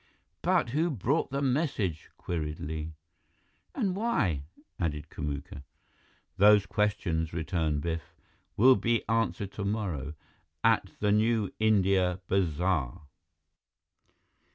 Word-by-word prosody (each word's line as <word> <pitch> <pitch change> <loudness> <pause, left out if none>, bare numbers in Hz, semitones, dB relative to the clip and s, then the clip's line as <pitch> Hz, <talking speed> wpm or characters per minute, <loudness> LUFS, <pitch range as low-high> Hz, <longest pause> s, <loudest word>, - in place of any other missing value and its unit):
"But - - +2
who 160 +6 +1
brought 140 - 0
the 140 +1 -2
message?" 125 - -1
queried 80 -3 -4
Li. 80 +1 -5 0.8
"And 200 -8 0
why?" 110 - 0 0.3
added 75 -4 -2
Kamuka. 70 -2 -5 0.8
"Those 105 0 +6
questions," 90 -7 -1
returned 80 -2 -1
Biff, 80 +1 -4 0.4
"will 130 +4 +7
be 115 -2 0
answered 115 -3 0
tomorrow, 100 -9 -3 0.5
at - - +3
the 105 -1 +3
New 110 -1 +2
India 95 -4 +3
Bazaar!" 90 -4 0
95 Hz, 100 wpm, -29 LUFS, 80-110 Hz, 0.8 s, will